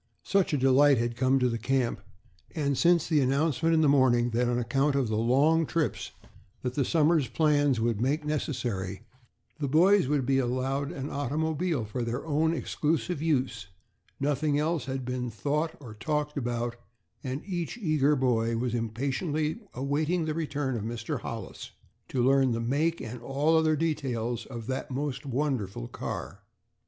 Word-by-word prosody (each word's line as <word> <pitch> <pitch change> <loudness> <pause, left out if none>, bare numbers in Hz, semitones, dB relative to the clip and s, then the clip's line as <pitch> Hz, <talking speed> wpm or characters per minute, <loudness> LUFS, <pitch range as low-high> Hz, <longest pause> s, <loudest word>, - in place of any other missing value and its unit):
Such 195 -2 +1
a 145 - +2
delight 135 +1 +5
had 120 0 -1
come 130 +2 +3
to 125 -1 +2
the 115 -1 -2
camp, 125 -3 0 0.5
and 140 -3 0
since 170 +3 +4
the 155 -3 +3
announcement 150 +4 +2
in 160 - +4
the 155 - +4
morning 125 -4 +4
that 120 +1 +1
on 120 - +1
account 135 +4 +1
of 135 -5 +1
the 110 - 0
long 140 +8 +3
trips 165 -3 -1 0.5
that 125 -1 -2
the 140 - +1
summer's 155 -1 +3
plans 145 -2 +2
would 115 -1 0
make 145 +5 0
necessary, 120 -10 -3 0.6
the 145 - -1
boys 180 +4 +4
would 140 -2 +1
be 135 +1 +2
allowed 135 +3 -1
an 135 +1 -5
automobile 150 0 -1
for 115 +4 -4
their 120 +4 -3
own 160 +1 +2
exclusive 160 +2 -1
use, 130 - 0 0.5
nothing 145 +1 +1
else 155 -2 0
had 130 -1 -4
been 125 -1 -3
thought 150 +8 -2
or 120 -7 -10
talked 150 +7 -2
about; 120 -3 -2 0.5
and 130 +2 -4
each 180 +1 -3
eager 155 - +2
boy 115 -3 +1
was 120 0 -1
impatiently 140 - -1 0.2
awaiting 150 +6 0
the 155 - -1
return 145 -4 -2
of 110 - -3
Mr. 115 +1 -3
Hollis - - -7 0.4
to 125 - 0
learn 135 -1 +4
the 115 - -1
make 145 +8 0
and 115 +1 -7
all 140 +6 +1
other 160 -1 +3
details 125 -7 -2
of 120 -4 -7
that 130 +2 -3
most 135 0 -3
wonderful 125 - -2
car. 75 +11 -6
135 Hz, 165 wpm, -28 LUFS, 120-155 Hz, 0.6 s, delight